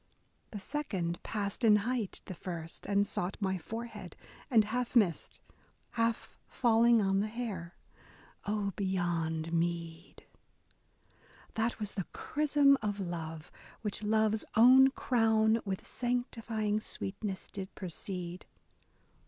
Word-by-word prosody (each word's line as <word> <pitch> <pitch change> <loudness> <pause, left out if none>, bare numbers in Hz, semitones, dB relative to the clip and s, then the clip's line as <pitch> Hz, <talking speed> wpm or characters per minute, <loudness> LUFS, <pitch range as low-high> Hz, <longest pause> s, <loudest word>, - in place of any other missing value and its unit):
The 210 - -6
second 190 - -3
passed 205 +2 -3
in 215 -2 +7
height 240 -5 -2
The - - -6
first, 170 -2 -6
and 200 0 +3
sought 180 -1 -2
my 190 -3 -1
forehead, 225 +7 -7 0.3
and 225 -5 +5
half 245 +4 -2
missed. 195 -9 +2 0.5
Half 230 -1 -1
falling 235 -1 +4
on 195 0 +2
the 210 - 0
hair. 210 -7 -5 0.7
Oh, 205 -1 -1
beyond 170 -4 -1
meed! 170 0 -3 1.3
That 225 +1 0
was 210 -2 -3
the 190 - -3
chrism 290 -2 +3
of 205 -1 -2
love, 165 -4 -5 0.3
which 210 -1 -2
love's 215 0 +2
own 255 +3 +8
crown. 225 -3 +2
With 190 -2 -3
sanctifying 230 -3 -1
sweetness, 195 -2 -4
did 190 -1 -6
precede. 180 0 -6
210 Hz, 115 wpm, -32 LUFS, 180-230 Hz, 1.3 s, own